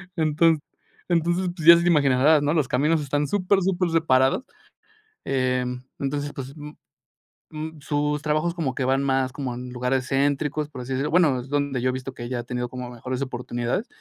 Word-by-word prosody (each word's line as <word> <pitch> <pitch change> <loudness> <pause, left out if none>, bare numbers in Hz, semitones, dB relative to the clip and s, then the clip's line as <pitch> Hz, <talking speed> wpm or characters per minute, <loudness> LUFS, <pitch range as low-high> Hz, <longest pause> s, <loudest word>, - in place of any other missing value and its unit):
Enton 160 0 +3 0.5
entonces, 175 +1 +1
pues, 165 -3 -4
ya 170 0 +10
te 175 - 0
imaginarás, 145 -1 +4
¿no? 145 +2 +1
Los 150 -6 +2
caminos 150 +5 +1
están 145 +1 -1
supersuper 185 -1 +1
separados. 135 - +3 0.8
Eh, 130 -1 0 0.3
entonces, 145 +1 -2
pues 135 +1 -7 1.2
sus 150 0 -1
trabajos 155 +3 0
como 150 -7 -2
que 135 - -2
van 135 +1 +2
más 135 -1 +1
como 130 -2 -4
en 125 +1 -7
lugares 125 +1 -1
céntricos, 145 +2 0
por 130 -4 -8
así 125 - -7
decirlo, 135 +3 -1
bueno, 155 -7 +4
es 125 - -8
donde 145 -2 -1
yo 130 - +1
he - - +2
visto 130 +1 -6
que 120 - -8
ella 120 0 -3
ha 120 - -4
tenido 125 0 -3
como 125 0 -7
mejores 125 +2 -5
oportunidades 125 - -3
140 Hz, 175 wpm, -24 LUFS, 130-155 Hz, 1.2 s, ya